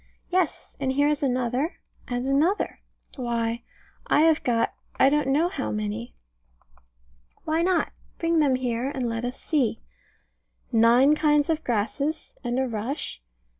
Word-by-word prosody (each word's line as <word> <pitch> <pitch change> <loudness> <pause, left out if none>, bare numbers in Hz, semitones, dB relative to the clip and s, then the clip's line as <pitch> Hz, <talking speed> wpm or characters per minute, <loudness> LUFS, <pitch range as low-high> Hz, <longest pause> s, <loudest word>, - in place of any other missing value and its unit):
Yes 360 -4 -1
and 270 -1 0
here 285 +2 +3
is 300 -1 0
another, 255 +3 0 0.3
and 245 0 -2
another. 300 +9 +1 0.4
Why, 235 -2 -1 0.5
I - - +4
have 320 -1 +4
got 230 -2 +1 0.3
I 270 - +7
don't 295 -1 +1
know 295 +5 +3
how 110 - -3
many. 105 +2 -4 1.3
Why 320 +1 +1
not? 360 -1 +1 0.3
Bring 330 -1 +1
them 280 -4 +3
here, 250 0 -1
and 265 -4 -2
let 230 0 -3
us 250 +1 -5
see. 280 -8 0 0.9
Nine 235 +5 +5
kinds 300 0 +3
of 315 0 -1
grasses, 255 +8 -2
and 240 0 -1
a 265 0 +1
rush. 230 - -4
265 Hz, 140 wpm, -25 LUFS, 235-300 Hz, 1.3 s, I